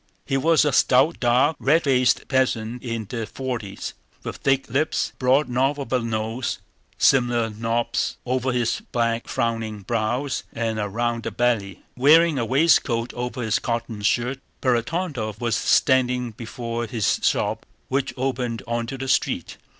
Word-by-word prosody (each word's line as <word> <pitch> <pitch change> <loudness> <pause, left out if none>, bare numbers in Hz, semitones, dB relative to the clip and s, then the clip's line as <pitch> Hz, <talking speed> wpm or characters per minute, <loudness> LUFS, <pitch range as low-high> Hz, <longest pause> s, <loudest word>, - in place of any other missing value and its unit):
He 135 - -1
was 160 +3 +4
a 150 - +2
stout, 135 +6 +4
dark, 130 +5 +3
red 155 +5 +3
faced 130 -3 +2
peasant 125 -3 0
in 115 -3 -4
the 115 -1 -4
forties, 125 -7 -5 0.3
with - - -5
thick 135 -1 +1
lips, 140 +6 0
a - - -36
broad 130 +3 +3
knob 135 +4 +1
of 135 - -5
a 130 - +3
nose, 115 +1 -2 0.4
similar 120 -3 +3
knobs 115 +2 -1
over 130 +1 0
his 120 -2 0
black 115 -1 0
frowning 115 -2 -2
brows, 120 +6 -1
and 115 -1 -2
a 105 -1 -2
round 115 +2 -2
belly. 115 -6 0
Wearing 155 +3 +5
a 120 - 0
waistcoat 130 -3 +2
over 125 0 -4
his 110 -2 +1
cotton 115 -3 -3
shirt, 125 +5 0 0.2
Ferapóntov 125 - -1
was 115 -3 0
standing 125 -1 +2
before 115 +1 -5
his 110 -4 0
shop - - 0 0.2
which 135 0 -1
opened 125 -3 -2
onto 120 +3 -3
the 135 +1 -5
street. - - 0
120 Hz, 150 wpm, -23 LUFS, 115-130 Hz, 0.4 s, Wearing